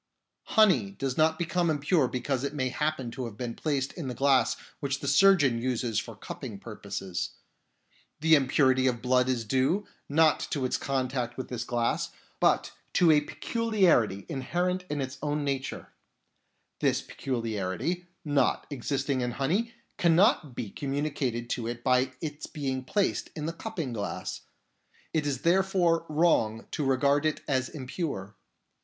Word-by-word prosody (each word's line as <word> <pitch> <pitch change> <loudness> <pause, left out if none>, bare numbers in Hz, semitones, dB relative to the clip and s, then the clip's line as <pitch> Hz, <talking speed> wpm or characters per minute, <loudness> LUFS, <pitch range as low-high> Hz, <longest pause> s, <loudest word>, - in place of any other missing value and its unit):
Honey 180 - +5
does 130 +6 -3
not 160 0 +3
become 170 0 0
impure 150 -1 +2
because 130 +1 -2
it 140 +1 -3
may 130 -3 0
happen 150 -3 -2
to 130 +1 -4
have 110 -3 -8
been 120 -2 -3
placed 140 -2 -1
in 160 -6 -5
the 125 - -4
glass 135 +1 +3 0.2
which 140 -1 -2
the 140 - -5
surgeon 145 -5 +5
uses 120 -3 0
for - - -7
cupping 105 - -7
purposes. 95 -4 -5 0.9
The 160 +1 +4
impurity 130 -2 +4
of 120 -2 -1
blood 125 0 +3
is 120 -3 0
due, 135 - +1 0.2
not 155 +1 +4
to 140 -4 -1
its 125 - 0
contact 130 -3 -2
with 130 - -5
this 120 -2 -3
glass, 120 -1 0 0.3
but - - +3 0.2
to 170 -3 +5
a 150 -1 +5
peculiarity 180 - +1
inherent 175 +6 -1
in 150 -1 -1
its 130 0 -5
own 150 0 -1
nature; 135 -1 -3 0.9
this - - +1
peculiarity, 115 - -3 0.2
not 145 -3 +2
existing 135 0 -1
in 120 -1 -1
honey, 190 +13 0 0.3
cannot 170 - +4
be 110 -5 -4
communicated 135 -4 -2
to 115 -2 -2
it 120 0 -5
by 130 0 +2
its 150 -2 -5
being 135 -3 -3
placed 200 +9 0
in 150 - -4
the 165 - -2
cupping 170 - -4
glass; 105 -3 -4 0.7
it 155 -2 +1
is 135 -3 -2
therefore 175 -2 +2
wrong 150 -9 +2
to 150 - -2
regard 140 +2 +3
it 155 0 0
as 130 -2 0
impure. 130 - -5
135 Hz, 150 wpm, -28 LUFS, 125-160 Hz, 0.9 s, Honey